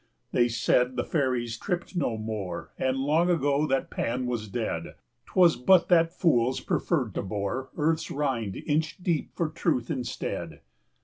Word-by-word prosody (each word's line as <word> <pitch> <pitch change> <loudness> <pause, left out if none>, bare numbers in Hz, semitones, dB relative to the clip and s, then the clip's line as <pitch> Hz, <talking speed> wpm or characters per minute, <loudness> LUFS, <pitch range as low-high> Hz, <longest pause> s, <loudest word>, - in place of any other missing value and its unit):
They 120 -1 +3
said 125 +2 +2
the - - 0
fairies 125 -6 -1
tript 180 0 -3
no 130 -9 0
more, 110 -4 -5
And 130 0 +1
long 155 +6 +2
ago 145 -3 +2
that 135 -1 0
Pan 125 +2 -1
was 120 -3 -2
dead; 100 -6 -3 0.3
'Twas 175 -3 +5
but 180 +8 +4
that 165 -2 +5
fools 130 -8 +2
preferred 130 - -1
to - - -2
bore 100 +6 -3
Earth's 160 +1 +1
rind 125 -9 -1
inch 155 +1 0
deep 170 -5 0
for 170 - 0
truth 155 -5 -1
instead. 130 -5 -4
130 Hz, 150 wpm, -27 LUFS, 120-160 Hz, 0.3 s, Twas